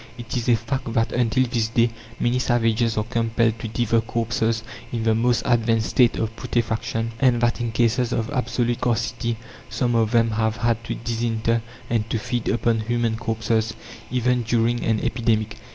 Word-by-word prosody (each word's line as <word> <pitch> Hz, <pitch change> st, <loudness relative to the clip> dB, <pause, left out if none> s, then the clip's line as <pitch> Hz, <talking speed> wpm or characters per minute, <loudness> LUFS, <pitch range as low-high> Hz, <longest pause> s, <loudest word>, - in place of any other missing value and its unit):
It 120 Hz, 0 st, -6 dB
is 120 Hz, -1 st, -1 dB
a 120 Hz, -, +6 dB
fact 120 Hz, +2 st, -3 dB
that 115 Hz, 0 st, +1 dB
until 125 Hz, +1 st, +2 dB
this 115 Hz, -2 st, 0 dB
day 115 Hz, +1 st, +2 dB, 0.3 s
many 120 Hz, +1 st, +1 dB
savages 115 Hz, -2 st, +1 dB
are 105 Hz, -, +2 dB
compelled 115 Hz, 0 st, 0 dB
to 115 Hz, -, -4 dB
devour 115 Hz, +1 st, +1 dB
corpses 115 Hz, 0 st, -1 dB, 0.3 s
in 115 Hz, -2 st, -2 dB
the 110 Hz, 0 st, +3 dB
most 115 Hz, +1 st, +2 dB
advanced 115 Hz, -2 st, +2 dB
state 125 Hz, -3 st, +4 dB
of 110 Hz, 0 st, -2 dB
putrefaction, 115 Hz, -1 st, -1 dB
and 125 Hz, -3 st, +4 dB
that 120 Hz, 0 st, +1 dB
in 120 Hz, -1 st, -1 dB
cases 120 Hz, +1 st, +1 dB
of 115 Hz, -2 st, -1 dB
absolute 120 Hz, -2 st, 0 dB
scarcity 115 Hz, -1 st, -1 dB, 0.3 s
some 120 Hz, -2 st, 0 dB
of 115 Hz, -2 st, +2 dB
them 115 Hz, -1 st, +3 dB
have 110 Hz, 0 st, 0 dB
had 115 Hz, +1 st, 0 dB
to -, -, -3 dB
disinter 115 Hz, 0 st, -1 dB, 0.3 s
and 115 Hz, -1 st, -1 dB
to 115 Hz, -, 0 dB
feed 120 Hz, +1 st, -3 dB
upon 115 Hz, -1 st, +1 dB
human 115 Hz, 0 st, 0 dB
corpses, 115 Hz, 0 st, -1 dB, 0.4 s
even 125 Hz, 0 st, +1 dB
during 120 Hz, +1 st, +1 dB
an 110 Hz, -1 st, +1 dB
epidemic. 110 Hz, -3 st, 0 dB
115 Hz, 175 wpm, -23 LUFS, 115-120 Hz, 0.4 s, a